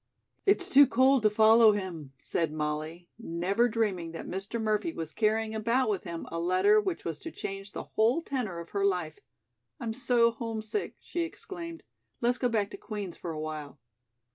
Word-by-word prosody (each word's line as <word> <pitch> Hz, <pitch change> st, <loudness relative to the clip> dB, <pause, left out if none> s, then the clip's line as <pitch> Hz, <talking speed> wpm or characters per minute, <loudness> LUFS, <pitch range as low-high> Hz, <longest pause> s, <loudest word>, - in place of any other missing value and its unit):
"It's 385 Hz, -2 st, +3 dB
too 285 Hz, -7 st, +7 dB
cold 260 Hz, +1 st, +4 dB
to 215 Hz, -, +4 dB
follow 220 Hz, +1 st, +6 dB
him," 170 Hz, -9 st, -5 dB
said 165 Hz, -3 st, -1 dB
Molly, 155 Hz, +3 st, -3 dB
never 195 Hz, +4 st, +1 dB
dreaming 195 Hz, -7 st, -1 dB
that 165 Hz, -, -6 dB
Mr. 195 Hz, +5 st, -4 dB
Murphy 215 Hz, +8 st, 0 dB
was 160 Hz, -, -6 dB
carrying 220 Hz, 0 st, +1 dB
about 230 Hz, +3 st, +1 dB
with 195 Hz, -2 st, -3 dB
him 170 Hz, -2 st, -5 dB
a 165 Hz, -, -3 dB
letter 185 Hz, +5 st, +4 dB
which 190 Hz, -4 st, -3 dB
was 160 Hz, -3 st, -3 dB
to -, -, -6 dB
change 195 Hz, +1 st, -6 dB
the -, -, -5 dB
whole 235 Hz, +9 st, +1 dB
tenor 245 Hz, -, -3 dB
of 170 Hz, 0 st, -7 dB
her 200 Hz, -1 st, -1 dB
life. 180 Hz, -6 st, 0 dB, 0.6 s
"I'm 225 Hz, -2 st, -3 dB
so 235 Hz, -1 st, +3 dB
homesick," 225 Hz, -, -4 dB
she 350 Hz, -, -5 dB
exclaimed, 335 Hz, 0 st, -6 dB, 0.4 s
"let's 245 Hz, +1 st, +1 dB
go 250 Hz, -, +2 dB
back 210 Hz, -3 st, 0 dB
to -, -, -7 dB
Queen's 205 Hz, -5 st, -6 dB
for 175 Hz, -, -7 dB
awhile." 155 Hz, -2 st, -5 dB
210 Hz, 175 wpm, -29 LUFS, 170-235 Hz, 0.6 s, too